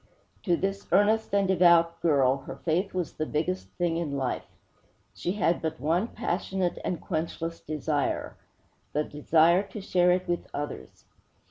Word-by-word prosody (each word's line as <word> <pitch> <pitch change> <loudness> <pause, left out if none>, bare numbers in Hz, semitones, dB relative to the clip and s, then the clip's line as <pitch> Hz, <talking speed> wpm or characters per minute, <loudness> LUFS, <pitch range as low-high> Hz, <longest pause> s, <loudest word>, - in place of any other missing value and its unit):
To 175 -4 +3
this 195 +1 -3
earnest 220 +2 +3
and 200 -1 +2
devout 170 -2 +4
girl, 140 -5 +3
her - - -5
faith 175 +4 -1
was 180 -3 -3
the 155 - -3
biggest 175 +5 -2
thing 170 -2 0
in 150 -5 -2
life. 130 -2 -2 0.7
She 180 - -2
had 175 -5 +1
but 160 -1 -3
one 170 +8 +1
passionate 185 -3 -2
and 175 - -2
quenchless 165 0 -3
desire: 150 -1 -2 0.6
the 150 - +1
desire 160 +4 +3
to 200 +1 -8
share 180 -2 +2
it 185 +1 0
with 175 -1 -2
others. 145 0 -6
170 Hz, 150 wpm, -27 LUFS, 155-185 Hz, 0.7 s, devout